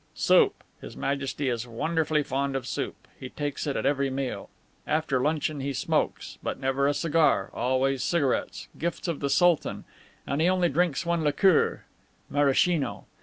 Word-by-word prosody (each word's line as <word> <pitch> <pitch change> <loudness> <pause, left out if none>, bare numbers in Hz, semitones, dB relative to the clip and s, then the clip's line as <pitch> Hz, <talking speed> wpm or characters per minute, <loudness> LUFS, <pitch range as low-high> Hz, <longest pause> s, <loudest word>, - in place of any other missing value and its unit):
"Soup. - - +3 0.2
His - - -10
Majesty 140 0 -2
is 120 -1 -2
wonderfully 155 +5 0
fond 140 0 -2
of 130 -2 -2
soup. - - -5
He 130 - -7
takes 145 +1 -4
it 140 - -1
at - - -2
every 140 -1 +1
meal. 135 -1 -4 0.4
After 150 -4 +1
luncheon 150 0 0
he 140 +1 -3
smokes, - - -2
but - - -4
never 135 +1 +1
a 145 - +2
cigar 155 - +2
always 130 +1 0
cigarettes, 140 -3 -1
gifts 170 +2 -3
of 165 -4 -2
the 140 - -1
Sultan; 175 +1 +2 0.4
and 140 +3 -1
he 170 - +4
only 180 -2 +2
drinks 165 -1 0
one 170 -1 0
liqueur, 155 +4 +3 0.5
Maraschino. 145 +2 +1
140 Hz, 160 wpm, -27 LUFS, 135-160 Hz, 0.5 s, he